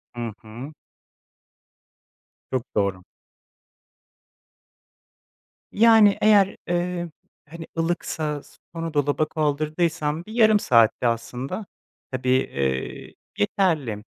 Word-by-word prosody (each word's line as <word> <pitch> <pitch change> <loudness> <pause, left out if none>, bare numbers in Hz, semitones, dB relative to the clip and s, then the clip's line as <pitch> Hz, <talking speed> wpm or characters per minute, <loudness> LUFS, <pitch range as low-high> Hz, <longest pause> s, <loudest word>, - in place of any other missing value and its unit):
Hı 120 -1 -4
hı. 120 +7 -9 1.8
Çok 130 0 -4
doğru. 100 -3 0 2.7
Yani 220 -2 +6
eğer, 205 -2 +5
eee, 175 0 -2 0.4
hani, 165 +1 -8
ılıksa 160 -3 -2 0.3
sonra 165 -1 -4
dolaba 145 +1 +1
kaldırdıysam 155 +1 -1
bir 215 - -10
yarım 220 -2 +5
saatte 115 - +3
aslında, 125 - -3 0.5
tabii, 130 -1 -2
eee, 70 - -1 0.2
yeterli. 135 - 0
150 Hz, 80 wpm, -24 LUFS, 120-175 Hz, 2.7 s, Yani